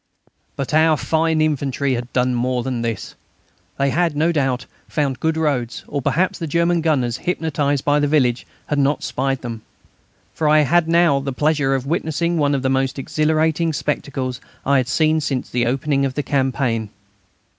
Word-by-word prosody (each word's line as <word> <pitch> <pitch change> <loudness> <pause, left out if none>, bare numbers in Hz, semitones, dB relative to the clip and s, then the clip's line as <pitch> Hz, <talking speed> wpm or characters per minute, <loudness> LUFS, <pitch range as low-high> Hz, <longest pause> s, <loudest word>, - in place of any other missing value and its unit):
But 140 0 -4
our 155 0 +4
fine 160 0 +1
infantry 140 -3 0
had 120 0 -4
done 125 0 +1
more 125 0 0
than 125 -2 -2
this. 115 -3 -4 0.6
They 140 0 +1
had, 170 -1 +1
no 160 +3 +2
doubt, 135 -5 0 0.2
found 140 -4 -1
good 160 0 0
roads, 140 -7 -1
or 140 - -3
perhaps 180 +8 0
the 165 - -3
German 170 +2 +1
gunners, 130 -7 +1
hypnotised 145 -5 -1
by 145 0 +3
the 145 - +2
village, 130 -5 +1 0.2
had 145 - -1
not 140 +2 +1
spied 135 0 -2
them. 115 -2 -5 0.7
For 155 -2 0
I 155 0 +6
had 165 +3 +3
now 170 -4 +4
the 135 0 -3
pleasure 145 0 +1
of 130 -1 -3
witnessing 165 +2 -1
one 145 -1 +2
of 135 - -2
the - - +1
most 135 0 0
exhilarating 155 +3 +1
spectacles 130 -4 -3 0.2
I 140 +1 +3
had 130 -2 +1
seen 155 +2 +2
since 135 -3 -3
the 120 -1 +1
opening 140 +2 0
of 135 -1 -1
the 145 - -1
campaign. 130 -5 0
140 Hz, 175 wpm, -20 LUFS, 130-155 Hz, 0.7 s, I